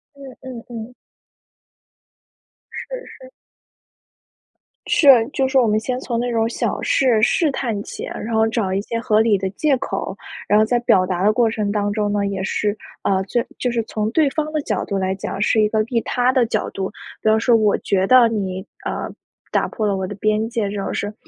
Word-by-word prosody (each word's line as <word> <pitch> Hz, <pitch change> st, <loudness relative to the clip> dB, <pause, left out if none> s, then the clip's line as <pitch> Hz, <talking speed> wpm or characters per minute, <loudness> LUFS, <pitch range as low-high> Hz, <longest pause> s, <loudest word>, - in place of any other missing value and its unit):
嗯 275 Hz, -2 st, -11 dB
嗯 250 Hz, -3 st, -8 dB
嗯。 235 Hz, 0 st, -7 dB, 1.8 s
是 -, -, -7 dB, 0.2 s
是。 -, -, -13 dB, 1.6 s
是， 295 Hz, -, +3 dB, 0.2 s
就 265 Hz, -2 st, +1 dB
是 -, -, -6 dB
说 265 Hz, -2 st, +5 dB
我 235 Hz, -, +2 dB
们 215 Hz, 0 st, +2 dB
先 250 Hz, +3 st, -3 dB
从 235 Hz, -3 st, -3 dB
那 245 Hz, 0 st, -1 dB
种 225 Hz, -1 st, +1 dB
小 -, -, -2 dB
事 245 Hz, -5 st, +2 dB
试 300 Hz, +7 st, +3 dB
探 230 Hz, -6 st, -2 dB
起， -, -, -8 dB
然 230 Hz, +2 st, -5 dB
后 220 Hz, 0 st, +3 dB
找 220 Hz, -5 st, -1 dB
一 195 Hz, -, 0 dB
些 230 Hz, +2 st, -4 dB
合 215 Hz, -1 st, +2 dB
理 220 Hz, -3 st, +3 dB
的 190 Hz, 0 st, -2 dB
借 285 Hz, +5 st, +1 dB
口。 270 Hz, -, -4 dB, 0.3 s
然 210 Hz, -, +4 dB
后 215 Hz, -, +4 dB
在 240 Hz, +2 st, +1 dB
表 190 Hz, -6 st, +3 dB
达 185 Hz, 0 st, -2 dB
的 210 Hz, -, +5 dB
过 225 Hz, +1 st, +2 dB
程 210 Hz, -2 st, -1 dB
当 205 Hz, -1 st, -1 dB
中 205 Hz, -1 st, 0 dB
呢， 205 Hz, -1 st, 0 dB
也 195 Hz, -1 st, -3 dB
是， 205 Hz, +2 st, -1 dB, 0.3 s
呃， 190 Hz, -1 st, +1 dB
就 235 Hz, +4 st, 0 dB, 0.2 s
就 250 Hz, -, 0 dB
是 235 Hz, -1 st, -1 dB
从 215 Hz, 0 st, -2 dB
对 310 Hz, +2 st, +3 dB
方 310 Hz, +1 st, -2 dB
的 310 Hz, -, -1 dB
角 210 Hz, -8 st, -2 dB
度 200 Hz, -, -2 dB
来 190 Hz, 0 st, 0 dB
讲， 195 Hz, 0 st, -5 dB
是 215 Hz, +1 st, +3 dB
一 210 Hz, -, +3 dB
个 220 Hz, 0 st, +1 dB
利 230 Hz, +1 st, -1 dB
他 250 Hz, +1 st, +1 dB
的 255 Hz, -3 st, +3 dB
角 -, -, -1 dB
度。 190 Hz, -1 st, -3 dB, 0.3 s
比 220 Hz, -, +2 dB
方 220 Hz, 0 st, +4 dB
说， 240 Hz, +2 st, +3 dB
“我 215 Hz, -2 st, +3 dB
觉 190 Hz, -1 st, 0 dB
得 255 Hz, 0 st, +7 dB
你， 190 Hz, -4 st, -3 dB, 0.2 s
呃， -, -, -3 dB, 0.4 s
打 -, -, +1 dB
破 215 Hz, -, -3 dB
了 200 Hz, -, +1 dB
我 190 Hz, -1 st, -3 dB
的 205 Hz, -, -6 dB
边 215 Hz, +2 st, 0 dB
界 230 Hz, -4 st, -1 dB
这 205 Hz, -, -5 dB
种 195 Hz, -1 st, -3 dB
事 -, -, -2 dB
儿”， 210 Hz, -, -7 dB
220 Hz, 230 characters per minute, -20 LUFS, 205-245 Hz, 1.8 s, 得